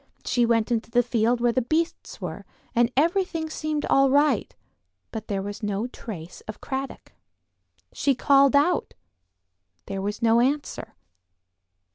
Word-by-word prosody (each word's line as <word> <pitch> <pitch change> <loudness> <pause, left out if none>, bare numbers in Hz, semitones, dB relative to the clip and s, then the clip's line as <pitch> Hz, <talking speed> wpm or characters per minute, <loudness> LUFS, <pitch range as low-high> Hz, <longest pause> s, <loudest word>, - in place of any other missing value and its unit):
She 240 -2 +2
went 230 0 +1
into 230 -1 -1
the 245 +1 +3
field 235 0 +1
where 240 0 +3
the 255 - +1
beasts 315 +7 -2
were, - - -6 0.3
and 240 0 +3
everything 330 0 +1
seemed 310 -2 -2
all 275 0 +4
right, 285 -4 +2 0.6
but 220 -1 -6
there 195 -2 -2
was 205 +2 -6
no 205 +1 -2
trace 180 -9 -8
of 215 - -7
Cradock. 270 0 -5 0.8
She 275 -2 +1
called 275 +2 +4
out; 320 +5 +2 0.9
there 195 0 -4
was 205 +2 -3
no 230 0 +5
answer. 265 -4 -2
245 Hz, 140 wpm, -25 LUFS, 220-285 Hz, 0.9 s, no